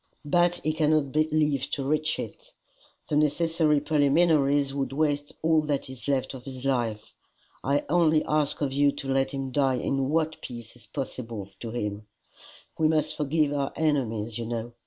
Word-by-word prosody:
"But 175 Hz, +3 st, +3 dB
he 155 Hz, +1 st, +1 dB
cannot 155 Hz, -3 st, +1 dB
live 155 Hz, -3 st, +1 dB
to 140 Hz, -, -2 dB
reach 155 Hz, +2 st, 0 dB
it. -, -, -8 dB, 0.5 s
The 150 Hz, -, -1 dB
necessary 155 Hz, 0 st, +2 dB
preliminaries 145 Hz, -1 st, +3 dB
would 135 Hz, -2 st, -2 dB
waste 145 Hz, -1 st, 0 dB
all 160 Hz, -1 st, +4 dB
that 140 Hz, -3 st, -2 dB
is 130 Hz, 0 st, -10 dB
left 135 Hz, -2 st, 0 dB
of 130 Hz, -2 st, -9 dB
his 130 Hz, -1 st, -8 dB
life. 115 Hz, -5 st, -1 dB, 0.5 s
I 140 Hz, +2 st, +1 dB
only 160 Hz, -1 st, +3 dB
ask 150 Hz, -1 st, +1 dB
of 135 Hz, -2 st, 0 dB
you 140 Hz, +1 st, +4 dB
to 135 Hz, -1 st, -3 dB
let 135 Hz, 0 st, +2 dB
him 135 Hz, -1 st, -4 dB
die 135 Hz, -1 st, +2 dB
in 135 Hz, +1 st, -1 dB
what 160 Hz, 0 st, 0 dB
peace 120 Hz, -2 st, -9 dB
is 115 Hz, -4 st, -18 dB
possible 115 Hz, -6 st, -5 dB
to 115 Hz, -, -6 dB
him. 105 Hz, -2 st, -4 dB, 0.7 s
We 160 Hz, -, +4 dB
must 155 Hz, 0 st, +1 dB
forgive 150 Hz, 0 st, +1 dB
our 140 Hz, -1 st, -1 dB
enemies, 120 Hz, -8 st, 0 dB
you 115 Hz, -, -4 dB
know. 115 Hz, 0 st, -4 dB
140 Hz, 170 wpm, -27 LUFS, 130-155 Hz, 0.7 s, all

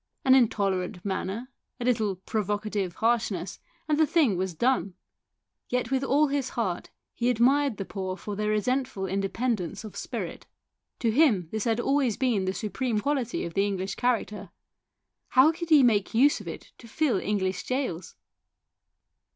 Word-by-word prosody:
An 260 Hz, -, +6 dB
intolerant 195 Hz, -7 st, +1 dB
manner, 200 Hz, +6 st, -3 dB, 0.3 s
a 240 Hz, -, -3 dB
little 220 Hz, -5 st, +1 dB
provocative 205 Hz, -1 st, -2 dB
harshness, 220 Hz, -6 st, 0 dB, 0.3 s
and 305 Hz, -1 st, +1 dB
the 315 Hz, -, +5 dB
thing 285 Hz, -, +3 dB
was 185 Hz, -1 st, -2 dB
done. 200 Hz, -3 st, +1 dB, 0.7 s
Yet 250 Hz, +1 st, -1 dB
with 265 Hz, 0 st, +1 dB
all 280 Hz, +3 st, +3 dB
his 275 Hz, -2 st, -1 dB
heart 185 Hz, -7 st, -2 dB, 0.2 s
he 240 Hz, +1 st, 0 dB
admired 255 Hz, +1 st, +3 dB
the 195 Hz, -, -4 dB
poor 185 Hz, -1 st, -4 dB
for 205 Hz, 0 st, -6 dB
their 210 Hz, +1 st, -1 dB
resentful 245 Hz, 0 st, 0 dB
independence 195 Hz, 0 st, -2 dB
of 215 Hz, -, -9 dB
spirit. -, -, -5 dB, 0.5 s
To 230 Hz, -, +2 dB
him 220 Hz, -, +3 dB
this 220 Hz, -1 st, -2 dB
had 230 Hz, 0 st, +1 dB
always 270 Hz, -3 st, +1 dB
been 235 Hz, -8 st, +1 dB
the 185 Hz, -, -1 dB
supreme 225 Hz, +1 st, -1 dB
quality 260 Hz, 0 st, -1 dB
of 170 Hz, -, -6 dB
the 200 Hz, +1 st, +2 dB
English 190 Hz, -1 st, -3 dB
character; 215 Hz, -5 st, -1 dB, 0.8 s
how 265 Hz, +5 st, +5 dB
could 335 Hz, +1 st, -6 dB
he 300 Hz, -4 st, +7 dB
make 215 Hz, -4 st, +2 dB
use 280 Hz, +5 st, +4 dB
of -, -, -12 dB
it -, -, -8 dB
to 235 Hz, -, -13 dB
fill 245 Hz, -4 st, +1 dB
English 190 Hz, -2 st, -2 dB
gaols 220 Hz, -11 st, -3 dB
220 Hz, 160 wpm, -27 LUFS, 195-255 Hz, 0.8 s, he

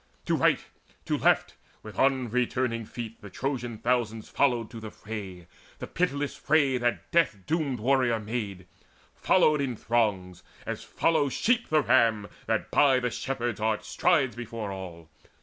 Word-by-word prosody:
To -, -, +1 dB
right, -, -, +2 dB, 0.4 s
to -, -, 0 dB
left, -, -, +2 dB, 0.3 s
with 110 Hz, -3 st, -9 dB
unreturning 125 Hz, -2 st, +1 dB
feet 115 Hz, -1 st, -7 dB
The 105 Hz, -, -9 dB
Trojan 120 Hz, +1 st, -3 dB
thousands 115 Hz, -2 st, -1 dB
followed 120 Hz, -5 st, +1 dB
to 115 Hz, -, -8 dB
the 110 Hz, -1 st, -7 dB
fray, 100 Hz, -5 st, -8 dB, 0.3 s
The -, -, -6 dB
pitiless 145 Hz, -5 st, -1 dB
fray, 140 Hz, -4 st, +2 dB
that 120 Hz, 0 st, -1 dB
death 165 Hz, -11 st, +3 dB
doomed 150 Hz, -6 st, -1 dB
warrior 125 Hz, -1 st, +2 dB
maid, 105 Hz, -4 st, -4 dB, 0.5 s
Followed 155 Hz, -5 st, +3 dB
in 130 Hz, -3 st, -2 dB
throngs, 100 Hz, -6 st, -1 dB, 0.2 s
as -, -, -4 dB
follow 155 Hz, -4 st, +1 dB
sheep 235 Hz, -, +1 dB
the 155 Hz, -2 st, +3 dB
ram 115 Hz, -6 st, +3 dB, 0.2 s
That -, -, -1 dB
by 135 Hz, -3 st, +5 dB
the 125 Hz, -1 st, -1 dB
shepherd's 120 Hz, -4 st, -3 dB
art 110 Hz, 0 st, 0 dB
strides 140 Hz, -, +2 dB
before 115 Hz, -3 st, -5 dB
all. 90 Hz, -4 st, -8 dB
120 Hz, 150 wpm, -27 LUFS, 110-135 Hz, 0.5 s, by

